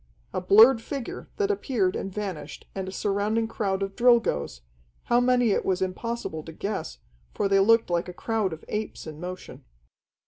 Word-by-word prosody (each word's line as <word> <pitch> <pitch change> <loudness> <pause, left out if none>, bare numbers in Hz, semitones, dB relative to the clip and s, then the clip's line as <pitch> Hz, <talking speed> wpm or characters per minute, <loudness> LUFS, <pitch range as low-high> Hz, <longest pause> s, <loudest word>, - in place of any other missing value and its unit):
A - - -1
blurred 225 +6 +7
figure 275 0 -6
that 415 -1 +1
appeared 235 - 0
and 195 - -4
vanished, 185 -8 -6
and 190 -1 -4
a - - -5
surrounding 210 +3 0
crowd 195 -3 -1
of 195 0 -5
Drilgoes 230 - +2 0.4
how 240 - +3
many 245 -2 +3
it - - +1
was 190 -1 0
impossible 190 -2 -3
to 160 - -10
guess, 165 - -4 0.4
for - - +1
they 195 0 +4
looked 230 0 +4
like 175 +1 0
a - - -7
crowd 220 0 -1
of 160 0 -8
apes 210 0 -4
in 155 -1 -8
motion. 180 +1 -8
200 Hz, 175 wpm, -26 LUFS, 185-230 Hz, 0.4 s, blurred